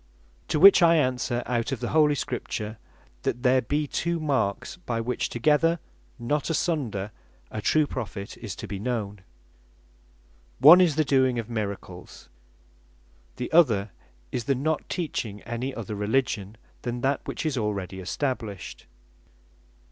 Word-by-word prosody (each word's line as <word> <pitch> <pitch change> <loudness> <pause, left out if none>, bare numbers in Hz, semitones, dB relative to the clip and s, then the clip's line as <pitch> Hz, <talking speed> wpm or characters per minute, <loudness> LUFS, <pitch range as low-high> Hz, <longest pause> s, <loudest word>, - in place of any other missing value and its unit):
To 150 - 0
which 195 +2 +9
I 170 -1 +6
answer 125 -4 0
out 120 0 -1
of 135 - -2
the 120 - -3
Holy 150 -2 +4
Scripture, 110 -4 -4 0.4
that 120 - -2
there 130 0 +4
be 145 +6 -1
two 170 +4 -2
marks, 135 -9 -1
by 120 -10 -3
which 125 +2 -2
together, 155 +7 +2 0.4
not 145 +6 -1
asunder, 135 - -1 0.4
a 110 - -4
true 155 +7 +3
Prophet 105 -7 -6
is 110 -4 -6
to - - -7
be 100 - -5
known. 105 -3 -3 1.4
One 165 +6 +9
is 170 -5 +3
the 155 0 +2
doing 130 -2 +3
of 115 0 -4
miracles; 100 -5 -6 1.1
the 125 - -5
other 110 - +4 0.4
is 120 -3 -3
the 140 - +2
not 155 +4 -2
teaching 115 - -3
any 120 +3 -3
other 110 -3 -5
Religion 105 -1 -1 0.2
than 120 0 -4
that 135 +2 +1
which - - -4
is 155 -3 0
already 100 -5 -3
established. 105 +1 -4
125 Hz, 140 wpm, -26 LUFS, 105-150 Hz, 1.4 s, which